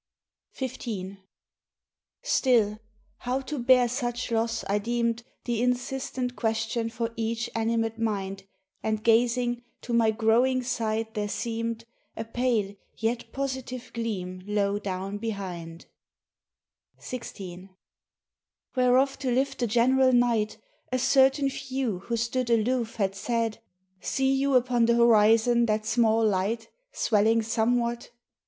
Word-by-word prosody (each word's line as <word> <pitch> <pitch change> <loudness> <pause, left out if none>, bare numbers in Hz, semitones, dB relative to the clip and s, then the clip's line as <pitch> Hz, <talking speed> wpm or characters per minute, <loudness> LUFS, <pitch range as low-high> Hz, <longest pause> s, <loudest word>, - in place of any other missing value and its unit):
XV 220 -7 -5 1.1
Still, 235 - +2 0.4
how 250 +2 -2
to 290 +1 -5
bear 250 0 +5
such 240 -1 -3
loss 230 0 0
I 205 +1 +1
deemed 235 +1 -1 0.2
The 235 -2 -1
insistent 250 0 -1
question 225 0 -1
for 230 0 -3
each 230 +1 -2
animate 225 0 0
mind, 195 -3 -2 0.3
And 215 -1 -1
gazing, 240 +1 +2 0.2
to 240 - -5
my 230 -1 +4
growing 235 +4 +2
sight 225 -2 -2
there 210 -1 -2
seemed 230 0 -3 0.3
A 225 - -3
pale 225 -4 0 0.2
yet 230 +2 -2
positive 260 -2 -4
gleam 185 -6 -4
low 205 -1 +1
down 195 0 -4
behind, 180 -7 -5 1.1
XVI 190 -6 -8 1.1
Whereof 255 +2 +3
to 270 -2 -2
lift 260 +3 0
the 240 - +1
general 255 +4 +4
night, 235 -3 +2 0.3
A 255 - +1
certain 270 +2 +4
few 260 -6 -3
who 230 +5 -3
stood 235 +2 -1
aloof 230 0 +1
had 195 -3 0
said, 230 +2 -1 0.4
"See 270 +5 +1
you 275 0 +2
upon 245 -2 +3
the 235 - +4
horizon 235 +1 +5
that 215 0 0
small 225 -1 +3
light— 215 +4 -1 0.2
Swelling 220 +1 +2
somewhat?" 235 +1 0
230 Hz, 120 wpm, -27 LUFS, 220-250 Hz, 1.1 s, bear